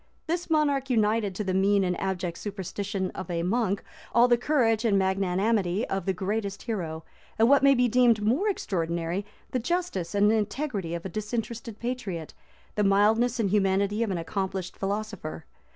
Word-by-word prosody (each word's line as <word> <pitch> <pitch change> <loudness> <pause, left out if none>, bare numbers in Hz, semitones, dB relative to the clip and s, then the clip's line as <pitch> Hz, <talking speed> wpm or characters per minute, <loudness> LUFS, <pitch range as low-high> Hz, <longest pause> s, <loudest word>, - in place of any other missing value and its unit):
This 345 +2 -2
monarch 285 -4 +2
united 215 -4 +1
to 210 - -2
the 190 -2 -1
mean 195 +1 +3
and 180 -1 0
abject 180 -3 -2
superstition 200 -1 -4
of 185 -2 -7
a 170 -1 -1
monk 200 +1 0 0.3
all 240 +1 +7
the 240 - +5
courage 240 -4 +2
and 215 -4 +3
magnanimity 190 +1 +1
of 195 -2 -2
the - - +3
greatest 200 +1 -3
hero; 165 -9 -4 0.3
and, 225 +1 +5
what 280 +2 +6
may 275 0 +6
be 250 0 +3
deemed 240 -2 +4
more 255 - +1
extraordinary, 170 - -2 0.2
the 255 - 0
justice 250 - -2
and 205 +1 +4
integrity 215 - -1
of 170 - -6
a - - -3
disinterested 225 +2 -4
patriot, 210 -10 -4 0.4
the 210 - +1
mildness 220 +5 +3
and 200 -4 +1
humanity 200 +1 +2
of 230 - +1
an 185 - -1
accomplished 190 +1 -3
philosopher. 200 -6 -4
205 Hz, 170 wpm, -27 LUFS, 190-235 Hz, 0.4 s, all